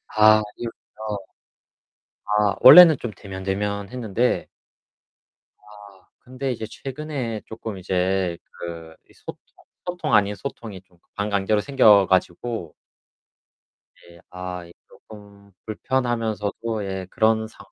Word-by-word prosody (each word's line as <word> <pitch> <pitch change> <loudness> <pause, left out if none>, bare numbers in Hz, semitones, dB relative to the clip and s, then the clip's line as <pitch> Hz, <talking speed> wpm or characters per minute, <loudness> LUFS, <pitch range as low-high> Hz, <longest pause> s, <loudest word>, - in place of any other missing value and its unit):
아. 110 0 +6 0.2
이웃이요. 110 -2 -7 1.2
아 100 -2 +2
원래는 165 +1 +10
좀 120 - -5
데면데면했는데 100 +4 -2 1.1
아 105 -2 -17
근데 130 +1 -5
이제 110 -2 -5
최근에 135 -5 -5
조금 110 -2 -7
이제 95 -1 -1
그 85 -1 -9
이 - - -21
소통 - - -10 0.5
소통 180 -7 -3
아닌 105 -1 +3
소통이 110 -6 -8
좀 90 -2 -30 0.2
반강제로 100 0 0
생겨 105 -8 +5
가지고 95 0 -1 1.2
예 85 0 -18
아 90 -1 -7
이 85 - -16
조금 100 -1 -16
불편하면서도 115 -2 -2
예 95 -1 -5
그런 110 +1 +1
상황. 100 -3 -17
105 Hz, 225 characters per minute, -23 LUFS, 95-115 Hz, 1.2 s, 원래는